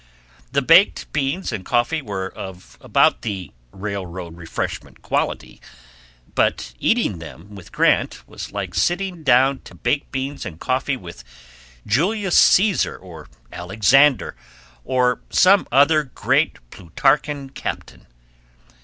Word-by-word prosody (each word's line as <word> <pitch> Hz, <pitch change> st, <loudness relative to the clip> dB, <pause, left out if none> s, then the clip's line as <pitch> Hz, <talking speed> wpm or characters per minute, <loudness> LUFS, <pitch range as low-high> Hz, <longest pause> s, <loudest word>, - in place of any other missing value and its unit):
The 140 Hz, 0 st, +1 dB
baked 165 Hz, +8 st, +4 dB
beans 150 Hz, +5 st, -1 dB
and 105 Hz, -5 st, -5 dB
coffee 120 Hz, -, 0 dB
were 100 Hz, -6 st, -4 dB
of 95 Hz, -1 st, -10 dB
about -, -, +2 dB
the 100 Hz, -5 st, -5 dB, 0.2 s
railroad 95 Hz, -4 st, -6 dB
refreshment 85 Hz, -1 st, -6 dB
quality; -, -, -3 dB, 0.7 s
but -, -, 0 dB
eating 220 Hz, -, +1 dB
them 85 Hz, +5 st, -12 dB
with 95 Hz, -4 st, -12 dB
Grant -, -, +1 dB
was -, -, -8 dB
like -, -, -5 dB
sitting 180 Hz, -1 st, -1 dB
down 135 Hz, -1 st, +3 dB
to -, -, -15 dB
baked 140 Hz, +4 st, -2 dB
beans 135 Hz, +1 st, -4 dB
and 80 Hz, -2 st, -8 dB
coffee 130 Hz, +1 st, -1 dB
with 85 Hz, -, -11 dB, 0.6 s
Julius 190 Hz, -, +1 dB
Caesar, 200 Hz, 0 st, +4 dB
or 85 Hz, -5 st, -13 dB, 0.2 s
Alexander, 115 Hz, +10 st, +3 dB, 0.5 s
or 125 Hz, -1 st, +1 dB
some 195 Hz, +2 st, +4 dB
other 145 Hz, +4 st, +4 dB
great 130 Hz, -, 0 dB
Plutarchan 135 Hz, -, -1 dB
captain. 135 Hz, -, -7 dB
130 Hz, 120 wpm, -21 LUFS, 95-150 Hz, 0.7 s, baked